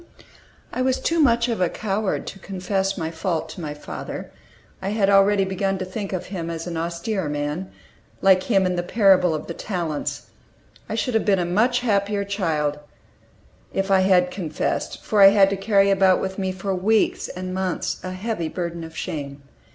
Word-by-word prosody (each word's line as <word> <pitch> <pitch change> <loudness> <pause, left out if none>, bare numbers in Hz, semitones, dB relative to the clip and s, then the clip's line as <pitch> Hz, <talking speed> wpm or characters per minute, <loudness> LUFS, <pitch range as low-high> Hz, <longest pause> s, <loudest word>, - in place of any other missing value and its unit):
I 255 - -1
was 260 0 +1
too 335 0 0
much 235 -5 +4
of 230 -5 -2
a 180 - +3
coward 205 0 -2
to 195 - -8
confess 195 +1 -2
my 160 -2 -3
fault 165 0 -2
to 180 - -8
my 150 -2 -5
father; 150 - -7 0.5
I 190 - -2
had 200 -1 +2
already 195 0 +5
begun 195 0 -1
to 185 - -4
think 195 +2 -5
of 185 -2 -3
him 170 -3 -3
as 165 -1 -4
"an 175 -1 -5
austere 170 +2 -2
man," 150 +5 -3 0.5
like 190 -1 +5
him 195 -2 +2
in 180 -1 0
the - - +1
parable 180 -3 +4
of 155 - -5
the 170 - -5
talents. 170 -6 -4 0.6
I - - -2
should 250 - -1
have 220 - +2
been 200 -2 +3
a 175 - 0
much 230 +8 +2
happier 205 -3 +1
child 160 -7 -1 0.9
if 195 0 -1
I 190 -1 +5
bad 180 -1 +4
confessed, 165 -6 -3
for 210 -2 +2
I 195 - +11
had 195 -1 +5
to - - +1
carry 195 0 +3
about 190 -1 +4
with 190 +1 -4
me 190 -1 -1
for 190 +1 -3
weeks 205 +4 +1
and 185 0 -6
months 185 -2 -2
a 185 - -4
heavy 185 -3 -3
burden 170 -1 -4
of 160 -1 -10
shame. 145 -5 -5
190 Hz, 190 wpm, -23 LUFS, 170-200 Hz, 0.9 s, I